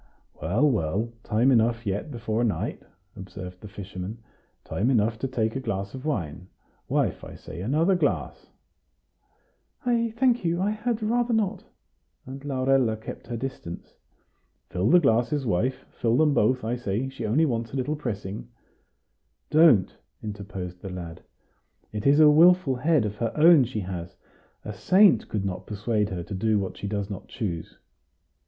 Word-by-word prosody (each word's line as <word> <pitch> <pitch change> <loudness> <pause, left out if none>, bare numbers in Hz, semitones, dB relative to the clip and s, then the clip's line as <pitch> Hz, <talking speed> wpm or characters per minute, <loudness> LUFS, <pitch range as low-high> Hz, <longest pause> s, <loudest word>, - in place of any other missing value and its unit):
"Well, 100 - +2
well, 110 - 0
time 115 +5 +2
enough 115 -1 +2
yet 100 +8 -2
before 115 -3 -2
night," 110 -4 -2 0.3
observed 90 -1 -9
the 105 - -9
fisherman; 100 +1 -7 0.5
"time 110 +7 -1
enough 110 -3 +2
to 135 - -1
take 115 -3 -1
a - - -1
glass 100 -5 -3
of 130 +1 -8
wine. 90 - -3 0.4
Wife, - - 0
I - - -9
say, 85 - -9
another 155 - +2
glass!" 180 - -1 1.4
"I 235 -1 +2
thank 245 -3 +3
you; 170 0 0
I 200 +3 +1
had 220 +1 -2
rather 240 +2 +1
not;" 210 -4 -1 0.6
and 135 +2 -9
Laurella 130 -4 +1
kept 110 - -9
her 120 - -4
distance. 120 -9 -7 0.8
"Fill 90 +4 +1
the 180 - +7
glasses, 135 +1 +1
wife; 115 +5 -1
fill 115 +1 0
them 150 -1 +4
both, 125 +2 +2
I 115 +2 -1
say; 120 +2 -2
she 135 -4 -5
only 145 +10 +3
wants 115 -5 -2
a - - -6
little 140 +4 -1
pressing." 105 -7 -5 1.0
"Don't," 150 - +5 0.3
interposed 95 -4 -6
the 95 - -6
lad. 85 -3 -7 0.7
"It 105 +4 -2
is 145 +2 +5
a 155 - +8
wilful 165 -2 +5
head 150 -2 +2
of 105 0 -4
her 115 -1 -1
own 155 -3 +7
she 110 -3 -4
has; 90 -2 -6 0.5
a 105 - -5
saint 175 - +4
could 100 -2 -2
not 95 -2 -4
persuade 105 0 -1
her 90 -2 -4
to 100 - -8
do 110 +3 +1
what 95 -2 -3
she 100 - -5
does 100 -1 -2
not 100 -3 -7
choose." 85 -7 -5
115 Hz, 160 wpm, -26 LUFS, 100-145 Hz, 1.4 s, a